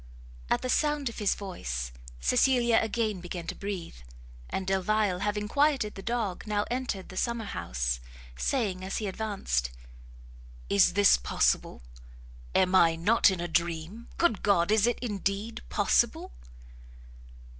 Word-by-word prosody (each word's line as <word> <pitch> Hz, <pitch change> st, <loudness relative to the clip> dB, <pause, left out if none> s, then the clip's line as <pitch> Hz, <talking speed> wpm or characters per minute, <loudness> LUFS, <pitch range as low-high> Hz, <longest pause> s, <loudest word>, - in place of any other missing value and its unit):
At -, -, +1 dB
the -, -, -1 dB
sound 295 Hz, -1 st, +1 dB
of 235 Hz, -, -9 dB
his 205 Hz, -2 st, +2 dB
voice, 60 Hz, -, -5 dB, 0.3 s
Cecilia 235 Hz, -, +3 dB
again 220 Hz, -3 st, -1 dB
began 175 Hz, -1 st, -6 dB
to -, -, -4 dB
breathe; 195 Hz, -, -6 dB, 0.5 s
and 190 Hz, -, -3 dB
Delvile 195 Hz, 0 st, +1 dB
having 210 Hz, +1 st, -1 dB
quieted 280 Hz, -4 st, +2 dB
the 195 Hz, -, -8 dB
dog, 225 Hz, -3 st, -3 dB
now 210 Hz, -1 st, 0 dB
entered 245 Hz, -7 st, -3 dB
the 185 Hz, -, -10 dB
summer 235 Hz, 0 st, -1 dB
house, -, -, -2 dB, 0.4 s
saying, 200 Hz, -, -1 dB
as 190 Hz, -, -3 dB
he 220 Hz, -, -3 dB
advanced, 190 Hz, -, -2 dB, 1.0 s
"Is 100 Hz, -, +5 dB
this 205 Hz, 0 st, +6 dB
possible! -, -, 0 dB, 0.7 s
am 185 Hz, 0 st, +3 dB
I 165 Hz, -3 st, +5 dB
not 205 Hz, +8 st, +4 dB
in 190 Hz, -2 st, -2 dB
a 175 Hz, -, -2 dB
dream? 170 Hz, +6 st, -2 dB
Good 280 Hz, -, +2 dB
God! 195 Hz, -2 st, +2 dB
is 215 Hz, +1 st, +4 dB
it 240 Hz, -, +1 dB
indeed 205 Hz, 0 st, -3 dB
possible!" -, -, +1 dB
200 Hz, 140 wpm, -28 LUFS, 175-225 Hz, 1.0 s, this